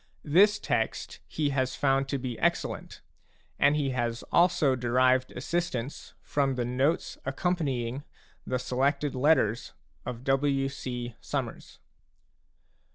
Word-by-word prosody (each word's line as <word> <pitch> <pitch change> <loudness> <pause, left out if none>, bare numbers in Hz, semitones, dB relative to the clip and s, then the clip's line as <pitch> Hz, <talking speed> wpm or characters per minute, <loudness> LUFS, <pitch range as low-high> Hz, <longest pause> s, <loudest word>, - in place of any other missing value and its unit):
This 200 +7 +5
text - - -2
he 150 -2 -1
has 130 -2 0
found 135 -1 +2
to 140 - -1
be 125 -3 -5
excellent, - - -1 0.6
and 145 +1 +5
he 140 -3 0
has 120 -2 -2
also 170 -6 +4
derived 130 +1 +2
assistance 145 -2 -3
from 140 -2 0
the 125 -1 -1
notes 130 +7 0
accompanying 135 -4 -1 0.4
the 130 - -1
Selected 135 +3 0
Letters 130 -5 +2 0.3
of 120 0 -6
W. 135 0 +1
C. 125 -3 -5
Summers. - - -5
135 Hz, 115 wpm, -28 LUFS, 125-145 Hz, 0.6 s, This